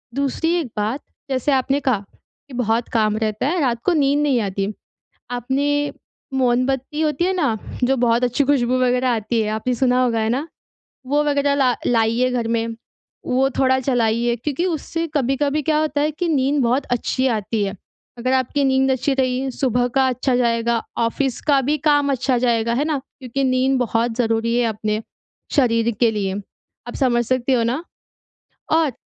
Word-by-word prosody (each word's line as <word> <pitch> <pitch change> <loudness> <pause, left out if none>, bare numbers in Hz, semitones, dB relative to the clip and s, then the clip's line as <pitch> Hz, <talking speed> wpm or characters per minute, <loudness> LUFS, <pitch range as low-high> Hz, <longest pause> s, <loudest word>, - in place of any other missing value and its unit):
दूसरी 280 +4 0
एक 315 - -3
बात 220 +7 -1 0.3
जैसे 265 +2 0
आपने 270 +1 +1
कहा, 250 -8 0 0.4
कि 275 - -13
बहुत 235 -1 0
काम 215 -2 +2
रहता 215 +2 -1
है, 350 +4 0
रात 235 -4 0
को 365 - +2
नींद 285 -2 +2
नहीं 280 -4 +2
आती। 195 0 -2 0.6
आपने 280 +4 0 0.4
मोमबत्ती 265 +3 0
होती 315 +2 +1
है 375 - +1
ना, 280 -12 0 0.3
जो 265 +2 +2
बहुत 240 0 +2
अच्छी 250 +4 +1
खुशबू 255 -3 +2
वग़ैरह 250 0 +2
आती 225 0 0
है, 210 - -2
आपने 220 +4 -1
सुना 250 0 +2
होगा। 235 -2 +1
है 220 - 0
ना? 275 +7 -1 0.6
वो 290 +3 +1
वग़ैरह 285 -1 +1
ला 260 -3 +3
लाइए 230 +1 +2
घर 240 -2 -1
में, 230 0 -1 0.5
वो 265 +2 +2
थोड़ा 260 -1 +3
चलाइए 235 -2 +1
क्योंकि 285 +8 -2
उससे 330 -1 -2
कभी-कभी 280 +2 0
क्या 305 +1 +1
होता 305 -2 0
है, 300 +1 +1
कि 340 +4 -3
नींद 280 -1 +2
बहुत 250 +4 +1
अच्छी 260 +2 0
आती 220 -2 -1
है। 195 +1 -3 0.4
अगर 255 +2 0
आपकी 260 +2 +1
नींद 265 0 +3
अच्छी 260 +2 0
रही, 260 0 0
सुबह 245 -2 0
का 265 -1 +4
अच्छा 255 +1 0
जाएगा, 235 -1 +1 0.2
ऑफ़िस 235 +2 0
का 285 -2 +5
भी 290 +4 0
काम 290 -1 +3
अच्छा 260 -1 +1
जाएगा। 235 -1 +1
है 275 +5 0
ना? 310 -2 0 0.2
क्योंकि 265 +1 -3
नींद 260 +1 +2
बहुत 230 -1 0
ज़रूरी 230 -1 +1
है, 245 - +2
अपने 215 0 -2 0.5
शरीर 235 -4 +3
के 235 -2 +4
लिए। 195 -3 -2 0.5
आप 240 - -6
समझ 240 -3 +1
सकते 255 +2 +1
हो 240 -2 +2
ना। 250 +8 -1 0.9
और 320 -3 +3
255 Hz, 180 wpm, -21 LUFS, 235-280 Hz, 0.9 s, का